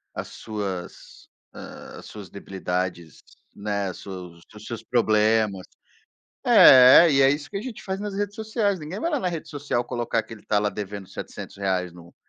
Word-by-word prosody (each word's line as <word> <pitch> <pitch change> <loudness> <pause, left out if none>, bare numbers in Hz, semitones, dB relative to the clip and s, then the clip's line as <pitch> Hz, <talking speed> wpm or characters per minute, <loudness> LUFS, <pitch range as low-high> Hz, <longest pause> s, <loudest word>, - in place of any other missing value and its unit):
as - - -5
suas, 100 -5 -7 0.3
ah, - - -10
as - - -13
suas 100 -4 -10
debilidades, 90 -4 -4 0.3
né, 100 -2 -3
seu 90 -2 -9 0.2
os 105 - -12
seus 115 -2 -6
problemas. 110 -4 +2 0.8
É, 130 +6 +9
e 140 - +3
é 135 0 +6
isso 145 +1 -3
que 200 - -5
a - - -5
gente 240 -2 -8
faz 190 0 -4
nas 205 -1 -4
redes 205 0 -3
sociais. 215 -3 -1
Ninguém 165 +7 -7
vai 335 - -1
lá 295 - 0
na 180 - 0
rede 165 -2 -5
social 145 -5 -2
colocar 120 -2 -1
que 110 - -13
ele 110 - -11
tá 105 - +2
lá 105 - +1
devendo 100 -2 -7
R$700 - - -8 0.4
no 85 0 -15
115 Hz, 175 wpm, -24 LUFS, 100-165 Hz, 0.8 s, É